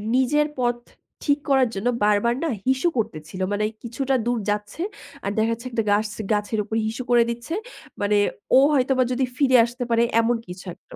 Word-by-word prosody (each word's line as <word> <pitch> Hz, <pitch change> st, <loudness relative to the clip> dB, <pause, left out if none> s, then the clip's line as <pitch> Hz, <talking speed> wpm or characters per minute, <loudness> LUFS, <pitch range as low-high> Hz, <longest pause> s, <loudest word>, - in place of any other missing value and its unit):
নিজের 295 Hz, +4 st, +3 dB
পথ 240 Hz, -1 st, +1 dB, 0.5 s
ঠিক 290 Hz, -1 st, +2 dB
করার 265 Hz, -3 st, +4 dB
জন্য 195 Hz, +5 st, -2 dB, 0.2 s
বারবার 210 Hz, +3 st, +3 dB
না 330 Hz, -, 0 dB, 0.2 s
হিসু 265 Hz, +6 st, +2 dB
করতেছিল। 165 Hz, -4 st, -4 dB
মানে 205 Hz, +1 st, 0 dB, 0.2 s
কিছুটা 265 Hz, +3 st, -1 dB
দূর 240 Hz, -1 st, 0 dB
যাচ্ছে 210 Hz, +8 st, -3 dB, 0.4 s
আর 200 Hz, -, 0 dB
দেখা 220 Hz, +1 st, +2 dB
যাচ্ছে 235 Hz, +2 st, -4 dB
একটা 230 Hz, -2 st, 0 dB
গাছ 210 Hz, +1 st, +2 dB, 0.2 s
গাছের 210 Hz, +1 st, 0 dB
উপর 220 Hz, +2 st, -5 dB
হিসু 225 Hz, +3 st, -4 dB
করে 240 Hz, -1 st, +6 dB
দিচ্ছে। 235 Hz, +7 st, -5 dB, 0.5 s
মানে 205 Hz, 0 st, +2 dB, 0.4 s
ও -, -, +9 dB
হয়তোবা 260 Hz, -1 st, +3 dB
যদি 255 Hz, +1 st, +1 dB
ফিরে 260 Hz, -3 st, +5 dB
আসতে 240 Hz, +2 st, -5 dB
পারে 230 Hz, 0 st, +3 dB, 0.2 s
এমন 235 Hz, +1 st, +2 dB
কিছু 180 Hz, +2 st, -9 dB
একটা। -, -, -16 dB
235 Hz, 180 wpm, -23 LUFS, 210-260 Hz, 0.5 s, ও